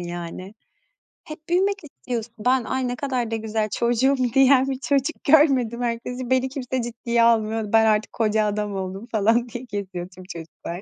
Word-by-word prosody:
yani. 175 +3 -7 0.7
Hep 310 +1 -11
büyümek 390 +2 +1
istiyorsun. 240 -5 -6
Ben, 250 +2 +2
"Ay, 260 +2 -2
ne 245 - -2
kadar 250 -4 -2
da - - 0
güzel 215 -1 -2
çocuğum." 240 +5 +2 0.2
diyen 270 0 +5
bir 265 -1 -3
çocuk 280 +3 -1
görmedim 270 -6 +4
herkesi. 245 +1 -3
"Beni 260 0 +2
kimse 260 -2 -3
ciddiye 235 0 0
almıyordu. 220 -2 +2
Ben 225 0 +6
artık 215 -1 +1
koca 215 -1 +1
adam 210 -1 -2
oldum." 190 +3 -5
falan 225 +3 +2
diye 245 +2 -7
geziyor 185 -3 -5
tüm 185 0 -13
çocuklar. 170 +1 -8
235 Hz, 165 wpm, -23 LUFS, 210-260 Hz, 0.7 s, Ben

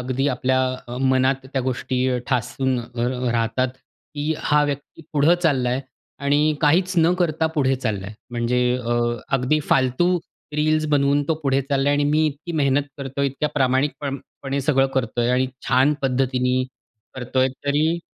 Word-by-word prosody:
अगदी 130 +2 -1
आपल्या 130 0 +1 0.3
अ, 120 - -5
मनात 130 0 +2
त्या 135 - 0
गोष्टी 130 0 -1
ठासून 130 0 0
अ, - - -8 0.2
अ, 125 0 -1
राहतात, 115 +2 0 0.5
की 150 +1 -1
हा 150 0 +2
व्यक्ती 145 +3 -5
पुढं 150 +4 +4
चालला 135 -7 +2
आहे 130 +2 0 0.4
आणि 150 +2 +3
काहीच 175 +5 +3
न 165 +1 +4
करता 160 -2 +1
पुढे 135 -3 +2
चालला 105 -7 -3
आहे. 105 - -8 0.2
म्हणजे 120 +1 0 0.2
अ, 120 -1 -3 0.4
अगदी 135 +4 +1
फालतू 135 +8 +3 0.4
रील्स 155 +1 +1
बनवून 145 0 +3
तो 160 - +3
पुढे 135 -1 +2
चालला 140 0 0
आहे 145 - +3
आणि 145 - +2
मी 155 +1 +3
इतकी 155 +4 -5
मेहनत 140 +1 +3 0.2
करतोय, 140 0 -2
इतक्या 140 +3 -2
प्रामाणिकपणे 135 0 -1
सगळं 135 -1 +3
करतोय, 120 -2 0
आणि 130 +1 +2 0.2
छान 135 +3 +4
पद्धतीने 130 -1 +1 0.5
करतोय, 130 +1 0 0.2
तरी 155 +4 +2
135 Hz, 155 wpm, -22 LUFS, 125-150 Hz, 0.5 s, पुढं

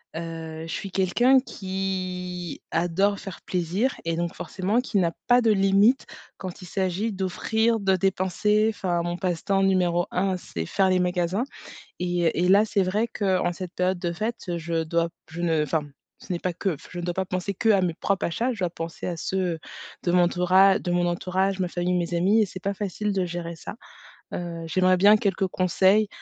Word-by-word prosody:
Heu, 165 -1 -6
je - - -6
suis 195 - -4
quelqu'un 240 +9 +4
qui 185 - -4
adore 175 +5 +1
faire 195 -4 -8
plaisir 185 +9 -1
et 165 - 0
donc, 170 0 -2
forcément 200 +5 -1
qui 240 -5 -1
n'a 170 -2 +2 0.2
pas 245 0 +6
de 225 - +4
limite 200 +5 +4 0.3
quand 185 0 -7
il 180 - -9
s'agit 190 +4 -1
d'offrir, 220 +4 0
de 190 -1 +2
dépenser, 195 +3 +1
enfin, 180 -5 -1
mon 175 0 -3
passe-temps 190 +1 0
numéro 180 -2 +2
1, 185 0 0
c'est 85 - -6
faire 190 -1 +2
les 185 - +3
magasins. 180 +4 0 0.5
Et 175 -1 +1
et - - +3
là, 200 +3 +6
c'est 210 -2 +1
vrai 205 +5 +1
qu'en 185 -5 0
cette 180 0 -7
période 180 0 0
de 175 -1 -2
fête, 205 -2 -3
je 165 0 -1
dois 170 +1 0 0.2
je 165 +2 -6
ne 165 -3 +2
enfin, 150 +1 0 0.3
ce - - -10
n'est 175 - -2
pas 180 0 -2
que 180 0 -1
je 180 - -9
ne - - -5
dois 175 0 -1
pas 190 +1 -1
penser 185 +2 -3
que 225 +4 0
à 200 -3 +5
mes 175 -2 0
propres 195 +4 -1
achats, 230 +9 -1
je 230 - -6
dois 180 -2 0
penser 165 -1 -6
à 175 -2 -3
ceux, 180 -1 -1 0.4
de 175 - 0
mon 175 0 +5
tourage 185 +2 +4
de 180 - -4
mon 175 0 +2
entourage, 185 +2 0
ma 185 - +1
famille, 175 +1 -1
mes 175 -1 -1
amis 195 +6 +4
et - - +3
c'est 185 - -8
pas 200 - 0
facile 205 +1 -3
de 190 -2 0
gérer 170 -1 -5
ça. 165 - -8 0.6
Heu, 170 -1 -5
j'aimerais 185 +3 +3
bien 205 +4 +7
quelques 195 -2 0
conseils, 190 +3 +3
185 Hz, 200 wpm, -25 LUFS, 175-195 Hz, 0.6 s, bien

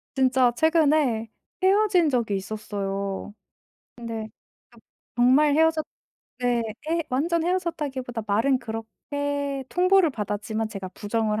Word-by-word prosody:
진짜 260 -2 +3
최근에 300 -8 +3 0.3
헤어진 380 -4 +4
적이 235 -6 0
있었어요. 195 0 -4 0.6
근데 230 -2 -5 0.4
그 235 - -19 0.4
정말 265 +5 +5
헤어졌 320 0 +3 0.6
네 245 -1 +1 0.3
헤 335 0 +1
완전 325 +6 +1
헤어졌다기보다 290 -10 -2
말은 230 +6 +2
그렇게 275 +5 -4
통보를 365 -1 +4
받았지만 215 -1 -3
제가 195 -3 -6
부정을 215 +1 -1
255 Hz, 265 characters per minute, -25 LUFS, 220-310 Hz, 0.6 s, 정말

